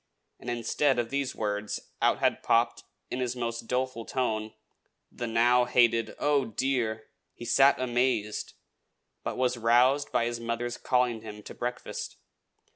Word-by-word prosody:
and, 120 - -7
instead 120 +3 +1
of 120 -1 -1
these 140 -1 -1
words, 105 -1 -2 0.2
out - - +3
had - - +1
popped, - - +1 0.3
in 125 - -2
his 125 -1 -1
most 115 -1 -4
doleful 125 -2 -1
tone, 110 -4 -2 0.6
the 120 - -5
now 120 +2 +4
hated 120 -2 +3
"Oh, 145 -2 +2
dear!" 115 -2 -1 0.3
He 120 - -9
sat 135 +4 +5
amazed; 120 -4 0 0.7
but - - -4
was 125 -1 +1
roused 125 +5 +3
by 115 - +2
his 120 0 -3
mother's 115 +1 -3
calling 125 -3 +1
him 105 -1 -9
to - - -9
breakfast. 125 0 -5
120 Hz, 145 wpm, -28 LUFS, 115-125 Hz, 0.7 s, sat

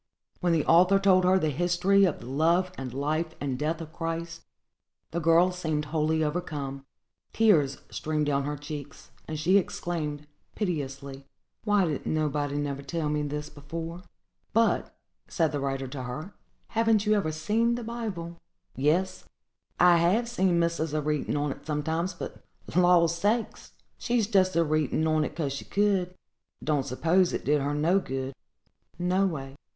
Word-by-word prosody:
When 175 -2 +1
the 160 -3 +2
author 180 +4 +6
told 190 -2 +4
her 185 +1 +5
the 155 -5 0
history 175 +5 +3
of 175 - -1
the - - -10
love 165 +7 +2
and 130 -5 -6
life 155 +5 -2
and 135 -3 -3
death 155 +2 -1
of 160 -1 -9
Christ, 165 0 -4 0.7
the 170 - -1
girl 165 +2 +4
seemed 160 -4 -2
wholly 160 0 +1
overcome; 145 -4 -4 0.5
tears 160 -12 +3
streamed 155 -1 -1
down 140 -1 0
her 145 0 -3
cheeks; 145 0 -8 0.2
and 155 - -4
she 185 +6 +4
exclaimed, 155 -5 -4 0.3
piteously, 140 -7 -4 0.4
"Why 205 -3 +3
didn't 150 -5 -2
nobody 145 -2 -1
never 140 -1 -2
tell 150 +2 -2
me 150 0 0
this 150 +1 -4
before?" 165 +4 -7 0.5
"But," 225 +1 +2 0.4
said 165 -4 +1
the 145 - -2
writer 135 -1 -2
to 130 0 -6
her, 140 +10 -6 0.4
"haven't 225 -2 +2
you 210 - +3
ever 195 -7 +1
seen 220 +10 +1
the 240 - -5
Bible?" 210 -8 -5 0.4
"Yes, 160 +8 0 0.5
I 175 -1 +7
have 190 +8 +2
seen 190 -7 +1
missus 170 -2 0
a 155 - +1
readin' 150 -1 -1
on't 145 -1 -3
sometimes; 160 +4 -1
but, - - -8 0.3
law 175 -1 +5
sakes! 205 +7 -1 0.3
she's 240 -3 +1
just 190 -4 +2
a 170 - +4
readin' 155 0 0
on't 155 -1 +1
'cause 145 -5 -2
she 140 - -5
could; 195 -3 +1 0.5
don't 145 -4 0
s'pose 170 +8 +2
it - - -3
did 150 0 +2
her 145 +1 -1
no 165 +6 +3
good, 135 -5 -4 0.6
no 180 +3 +2
way." 135 -6 -5
160 Hz, 160 wpm, -27 LUFS, 145-180 Hz, 0.7 s, I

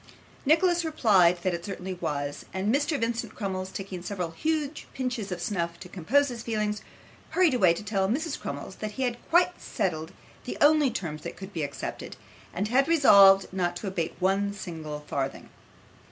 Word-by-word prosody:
Nicholas 345 +3 +4
replied, 205 - +4
that 185 - +1
it 170 0 -4
certainly 190 -1 -5
was; 145 -5 -3
and 195 +4 +1
Mr. 290 +1 +1
Vincent 230 +1 -2
Crummles 190 -2 -3
taking 190 -2 -6
several 180 -2 -4
huge 310 - -2
pinches 245 -6 -3
of 180 - -3
snuff 170 -2 -2
to 180 - -9
compose 230 - +1
his 240 -2 -6
feelings, 215 -2 -2 0.5
hurried 360 -6 +3
away 190 -9 +5
to 170 - -3
tell 195 -2 0
Mrs. 300 +6 -1
Crummles 145 +6 -6
that 215 -1 -5
he 265 - -2
had 245 -2 -1
quite 355 +1 +3
settled 160 -4 -2 0.3
the - - -5
only 295 -1 +5
terms 155 -9 -4
that - - -7
could 195 +1 -9
be 165 - -3
accepted, 140 -1 -5 0.3
and 200 +4 -2
had 270 +4 +3
resolved 200 -12 +7
not 175 -2 0
to 190 - -6
abate 185 -4 -2
one 195 +2 +1
single 160 -6 -6
farthing. 140 -2 -4
195 Hz, 175 wpm, -27 LUFS, 175-255 Hz, 0.5 s, resolved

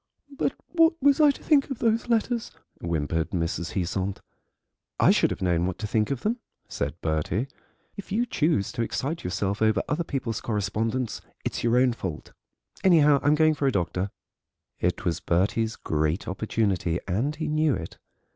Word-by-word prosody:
"But - - 0 0.2
what 330 -1 +4
was 285 +2 +4
I 300 - +7
to 280 - -2
think 290 -3 +3
of 270 - -3
those 230 +1 +1
letters?" 230 0 +1 0.3
whimpered 80 -1 -1
Mrs. 85 -1 -2
Heasant. 95 +1 -2 0.8
"I - - +6
should - - +3
have - - -4
known 90 -1 +2
what 95 - -3
to 115 - -4
think 105 0 +1
of 135 -3 -2
them," 230 +4 -1 0.3
said 75 +4 -4
Bertie; 80 - -1 0.5
"if 200 - -9
you 230 +5 +1
choose 155 - +1
to - - -3
excite 140 +7 -2
yourself 95 +3 -2
over 110 -3 +3
other 150 +4 0
people's 125 -8 -3
correspondence 110 +3 -2 0.2
it's - - -2
your 120 +1 +3
own 125 -1 +4
fault. 90 -9 -6 0.5
Anyhow, 150 -6 +6
I'm 145 +1 +4
going 155 0 +4
for 145 -2 0
a - - +3
doctor." 90 -1 -1 0.7
It 90 +1 -1
was 85 -1 0
Bertie's 105 +5 +1
great 80 +3 -1
opportunity, 95 -3 0
and 115 +11 0
he 155 0 -3
knew 155 -2 +2
it. 80 - -7
110 Hz, 170 wpm, -26 LUFS, -, 0.8 s, I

